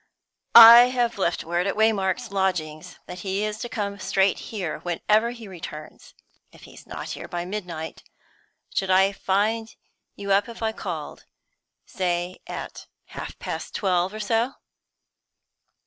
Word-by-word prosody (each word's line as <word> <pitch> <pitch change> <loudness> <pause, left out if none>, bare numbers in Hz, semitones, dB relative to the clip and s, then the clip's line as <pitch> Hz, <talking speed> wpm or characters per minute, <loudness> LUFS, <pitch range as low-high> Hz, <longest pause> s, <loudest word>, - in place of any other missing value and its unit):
"I 235 +1 +12
have 245 -3 -1
left 175 -3 0
word 175 +3 -1
at 195 - -1
Waymark's 220 +1 +1
lodgings 180 -4 -2
that 180 - -9
he 195 +2 -2
is 215 0 -3
to 240 - -5
come 200 -3 -4
straight 190 0 +1
here 190 -8 -4
whenever 210 +6 +1
he 235 -3 -9
returns. 165 -4 -10 0.4
If - - -18
he's - - -14
not - - -7
here - - -7
by 175 0 -4
midnight, 180 -5 -6 0.7
should 195 - -1
I 190 +1 +4
find 215 +3 -1 0.4
you 200 0 -5
up 200 +3 +3
if 230 0 -8
I 220 - +1
called 175 -8 -7 0.6
say 175 0 -2
at - - -7 0.3
half - - -7
past - - -6
twelve 185 -2 +1
or 215 - -8
so?" 225 +4 0
195 Hz, 145 wpm, -24 LUFS, 180-220 Hz, 0.7 s, I